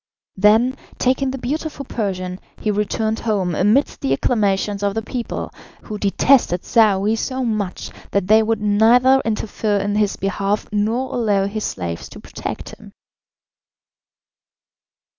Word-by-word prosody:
Then, 220 Hz, +6 st, +4 dB, 0.2 s
taking 260 Hz, +1 st, +1 dB
the 265 Hz, -, -4 dB
beautiful 285 Hz, +3 st, -4 dB
Persian, 185 Hz, -6 st, -3 dB, 0.2 s
he 215 Hz, -, 0 dB
returned 215 Hz, +2 st, -1 dB
home 200 Hz, -6 st, -1 dB
amidst 210 Hz, -, +2 dB
the 135 Hz, -, +1 dB
acclamations 205 Hz, -, 0 dB
of 200 Hz, 0 st, 0 dB
the 225 Hz, -, -2 dB
people, 240 Hz, +1 st, -4 dB, 0.3 s
who 210 Hz, -2 st, -6 dB
detested 200 Hz, -2 st, +2 dB
Saouy 210 Hz, -3 st, +3 dB
so 260 Hz, +3 st, -2 dB
much 215 Hz, -5 st, -3 dB, 0.2 s
that 200 Hz, -2 st, 0 dB
they 215 Hz, +3 st, +5 dB
would 220 Hz, 0 st, 0 dB
neither 235 Hz, +6 st, +4 dB
interfere 215 Hz, -1 st, -1 dB
in 200 Hz, +1 st, -1 dB
his 210 Hz, -1 st, +1 dB
behalf 200 Hz, +1 st, -1 dB
nor 225 Hz, +5 st, -1 dB
allow 205 Hz, -5 st, +1 dB
his 210 Hz, +2 st, -3 dB
slaves 85 Hz, -3 st, -4 dB
to -, -, -11 dB
protect -, -, -6 dB
him. -, -, -14 dB
215 Hz, 135 wpm, -20 LUFS, 200-235 Hz, 0.3 s, they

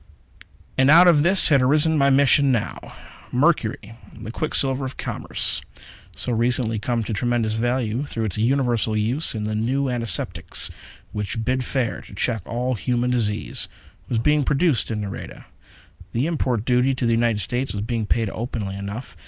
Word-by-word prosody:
And 130 Hz, +1 st, +5 dB
out 170 Hz, +4 st, +8 dB
of 160 Hz, -4 st, +6 dB
this 185 Hz, +5 st, +4 dB
had 140 Hz, -4 st, +5 dB
arisen 150 Hz, +5 st, +3 dB
my 140 Hz, -2 st, +4 dB
mission 140 Hz, 0 st, +4 dB
now. 115 Hz, -5 st, -1 dB, 0.5 s
Mercury 125 Hz, -6 st, +1 dB, 0.3 s
the 110 Hz, -, -7 dB
quicksilver 135 Hz, -1 st, 0 dB
of 130 Hz, 0 st, -6 dB
commerce -, -, -1 dB, 0.5 s
so 125 Hz, -, -2 dB
recently 115 Hz, -1 st, +1 dB
come 120 Hz, +1 st, -1 dB
to 110 Hz, -, -4 dB
tremendous 115 Hz, 0 st, 0 dB
value 120 Hz, +1 st, -1 dB
through 115 Hz, -5 st, -3 dB
its 100 Hz, -, -3 dB
universal 120 Hz, -3 st, +1 dB
use 120 Hz, +7 st, 0 dB
in 105 Hz, -, -3 dB
the 110 Hz, 0 st, -2 dB
new 130 Hz, +6 st, 0 dB
antiseptics 115 Hz, -8 st, -1 dB, 0.4 s
which 105 Hz, +2 st, -3 dB
bid 130 Hz, 0 st, 0 dB
fair 125 Hz, -3 st, -2 dB
to -, -, -13 dB
check 115 Hz, +1 st, 0 dB
all 125 Hz, +2 st, -1 dB
human 125 Hz, +1 st, -1 dB
disease 110 Hz, -3 st, -1 dB, 0.4 s
was 120 Hz, -, 0 dB
being 150 Hz, +5 st, +2 dB
produced 145 Hz, -1 st, +1 dB
in 110 Hz, -2 st, -2 dB
Nareda. 100 Hz, -1 st, -7 dB, 0.7 s
The 120 Hz, +4 st, 0 dB
import 130 Hz, -9 st, -1 dB
duty 125 Hz, +1 st, +3 dB
into 130 Hz, -2 st, -1 dB
the 115 Hz, -, +2 dB
United 115 Hz, -2 st, +1 dB
States 120 Hz, +8 st, -2 dB
was 100 Hz, 0 st, -3 dB
being 115 Hz, -2 st, -2 dB
paid 115 Hz, 0 st, +1 dB
openly 110 Hz, -4 st, -4 dB
enough. 100 Hz, +5 st, -7 dB
120 Hz, 165 wpm, -22 LUFS, 110-135 Hz, 0.7 s, out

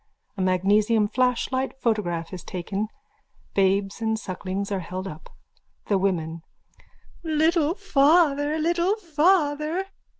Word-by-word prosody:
A 195 Hz, -, -4 dB
magnesium 205 Hz, +4 st, +3 dB
flashlight 255 Hz, +3 st, 0 dB
photograph 185 Hz, -8 st, -1 dB
is 180 Hz, -, -7 dB
taken. 195 Hz, +4 st, -3 dB, 0.7 s
Babes 195 Hz, +2 st, +1 dB
and 220 Hz, 0 st, 0 dB
sucklings 195 Hz, 0 st, -4 dB
are 195 Hz, -, 0 dB
held 185 Hz, +2 st, -5 dB
up.)_ 155 Hz, -3 st, -9 dB, 0.6 s
THE 200 Hz, -2 st, +3 dB
WOMEN: 165 Hz, -4 st, -1 dB, 0.8 s
Little 320 Hz, +1 st, +2 dB
father! 295 Hz, -4 st, +3 dB
Little 345 Hz, +5 st, +1 dB
father! 320 Hz, -2 st, +1 dB
220 Hz, 105 wpm, -25 LUFS, 190-305 Hz, 0.8 s, magnesium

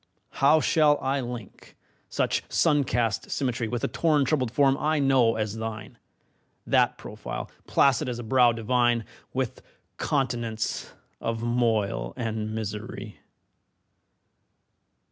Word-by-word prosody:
How 145 Hz, +3 st, +6 dB
shall 150 Hz, -3 st, +4 dB
I 135 Hz, +1 st, 0 dB
link 120 Hz, -4 st, -8 dB, 0.3 s
such -, -, 0 dB
sun 145 Hz, -3 st, +3 dB
cast 115 Hz, -4 st, -1 dB
symmetry 125 Hz, -4 st, -1 dB
With 120 Hz, +1 st, -3 dB
the -, -, +2 dB
torn 150 Hz, -4 st, +2 dB
troubled 130 Hz, -4 st, +1 dB
form 135 Hz, +2 st, +3 dB
I 155 Hz, +1 st, +1 dB
know 135 Hz, -5 st, +3 dB
as 110 Hz, 0 st, -2 dB
thine, 110 Hz, -1 st, -6 dB, 0.7 s
That -, -, +3 dB
profile, -, -, -7 dB, 0.2 s
placid 130 Hz, -2 st, +3 dB
as 120 Hz, -, -3 dB
a 120 Hz, -, -6 dB
brow 120 Hz, +1 st, +4 dB
divine, 120 Hz, 0 st, +1 dB, 0.3 s
With -, -, -3 dB, 0.4 s
continents 120 Hz, -5 st, -2 dB, 0.3 s
of 115 Hz, 0 st, -3 dB
moil 110 Hz, -, 0 dB
and 110 Hz, -2 st, -3 dB
misery? 105 Hz, 0 st, -6 dB
120 Hz, 120 wpm, -26 LUFS, 110-135 Hz, 0.7 s, How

